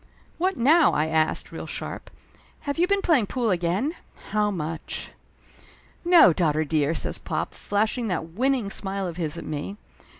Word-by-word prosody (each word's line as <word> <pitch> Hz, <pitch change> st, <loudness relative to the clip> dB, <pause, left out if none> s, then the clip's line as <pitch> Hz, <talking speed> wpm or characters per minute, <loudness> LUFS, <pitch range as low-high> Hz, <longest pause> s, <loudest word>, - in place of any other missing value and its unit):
"What 370 Hz, 0 st, +1 dB
now?" 310 Hz, +7 st, +5 dB
I 150 Hz, -, +2 dB
asked, 160 Hz, 0 st, 0 dB
real -, -, -7 dB
sharp. -, -, -6 dB, 0.5 s
"Have 285 Hz, +2 st, -3 dB
you 350 Hz, -, +4 dB
been 400 Hz, 0 st, +1 dB
playing 275 Hz, -, +3 dB
pool 235 Hz, -2 st, 0 dB
again? 185 Hz, -, 0 dB, 0.4 s
How 210 Hz, 0 st, +2 dB
much?" 165 Hz, -4 st, -4 dB, 0.9 s
"No, 340 Hz, -, +7 dB
daughter 155 Hz, -2 st, +1 dB
dear!" 150 Hz, +1 st, +1 dB
says -, -, -3 dB
pop, -, -, -3 dB
flashing 215 Hz, +3 st, -1 dB
that 165 Hz, -4 st, -2 dB
win 255 Hz, +11 st, +1 dB
ning 225 Hz, -7 st, -2 dB
smile 195 Hz, -1 st, -3 dB
of 175 Hz, -2 st, -5 dB
his 160 Hz, -4 st, -2 dB
at -, -, -7 dB
me. 155 Hz, +7 st, -5 dB
200 Hz, 165 wpm, -25 LUFS, 165-265 Hz, 0.9 s, No